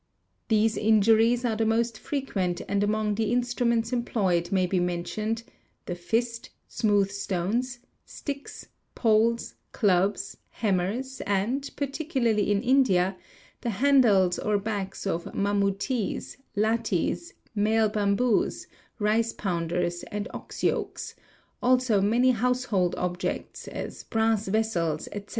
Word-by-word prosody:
These 220 Hz, 0 st, +2 dB
injuries 225 Hz, +3 st, +4 dB
are 225 Hz, -2 st, +1 dB
the 225 Hz, -, 0 dB
most 225 Hz, 0 st, +1 dB
frequent 195 Hz, -11 st, -2 dB
and 200 Hz, 0 st, +1 dB
among 210 Hz, 0 st, +1 dB
the 220 Hz, +1 st, 0 dB
instruments 240 Hz, -1 st, +1 dB
en 240 Hz, -1 st, +1 dB
ployed 185 Hz, -8 st, 0 dB
may 190 Hz, -2 st, +3 dB
be 180 Hz, +1 st, 0 dB
mentioned: 210 Hz, +6 st, -2 dB, 0.4 s
the 180 Hz, -, -3 dB
fist, 230 Hz, +6 st, -2 dB, 0.2 s
smooth 205 Hz, -3 st, +1 dB
stones, 200 Hz, +6 st, -2 dB, 0.3 s
sticks, 280 Hz, -1 st, -7 dB, 0.3 s
poles, 230 Hz, +1 st, +2 dB, 0.2 s
clubs, 195 Hz, -1 st, +1 dB, 0.2 s
he 220 Hz, -, +1 dB
mimers 210 Hz, +9 st, -1 dB
and, 220 Hz, +8 st, 0 dB
particularly 270 Hz, -7 st, 0 dB
in 205 Hz, +1 st, +1 dB
India, 200 Hz, -8 st, +3 dB, 0.5 s
the 240 Hz, -, -2 dB
handles 210 Hz, -6 st, +4 dB
or 210 Hz, -1 st, +1 dB
backs 200 Hz, -2 st, -4 dB
of 170 Hz, -3 st, -1 dB
mamooties, 200 Hz, +3 st, -1 dB, 0.2 s
lathis, 225 Hz, -, 0 dB, 0.2 s
male 220 Hz, +1 st, +3 dB
bamboos, 210 Hz, +2 st, +1 dB, 0.3 s
rice 225 Hz, +2 st, +1 dB
pounders, 175 Hz, -1 st, -2 dB
and 205 Hz, 0 st, -3 dB
ox -, -, -8 dB
yokes: -, -, -1 dB, 0.5 s
also 250 Hz, -5 st, +3 dB
many 240 Hz, +6 st, +4 dB
household 240 Hz, -6 st, +1 dB
objects, 180 Hz, 0 st, -3 dB
as -, -, -6 dB
brass 220 Hz, -2 st, +1 dB
vessels, 190 Hz, -7 st, 0 dB
etc. 205 Hz, 0 st, -7 dB
215 Hz, 120 wpm, -27 LUFS, 195-235 Hz, 0.5 s, injuries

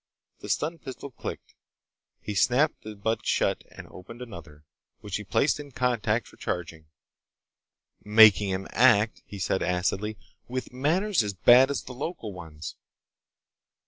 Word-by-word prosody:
The -, -, -9 dB
stun 165 Hz, +2 st, -1 dB
pistol 135 Hz, 0 st, -8 dB
clicked. -, -, -8 dB, 0.7 s
He 105 Hz, -, -5 dB
snapped 125 Hz, +9 st, +2 dB
the 110 Hz, 0 st, -8 dB
butt 110 Hz, +2 st, -2 dB
shut -, -, 0 dB
and -, -, -11 dB
opened 115 Hz, +6 st, -12 dB
another, 85 Hz, -11 st, -11 dB, 0.4 s
which 100 Hz, -3 st, -4 dB
he 105 Hz, -, -7 dB
placed 115 Hz, +9 st, +1 dB
in 145 Hz, -2 st, -10 dB
contact 120 Hz, -3 st, 0 dB
for -, -, -17 dB
charging. 80 Hz, -3 st, -5 dB, 1.2 s
"Making 105 Hz, -1 st, +6 dB
him 95 Hz, +1 st, -3 dB
act," 115 Hz, -3 st, +4 dB
he 100 Hz, -, -8 dB
said 95 Hz, 0 st, -1 dB
acidly, 95 Hz, +4 st, -1 dB, 0.3 s
"with 130 Hz, 0 st, -5 dB
manners 170 Hz, -, +1 dB
as 100 Hz, -2 st, -3 dB
bad 125 Hz, +8 st, +6 dB
as 140 Hz, -, -2 dB
the 125 Hz, -, -9 dB
local 125 Hz, -, -5 dB
ones. 80 Hz, -4 st, -9 dB
110 Hz, 145 wpm, -27 LUFS, 95-130 Hz, 1.2 s, Making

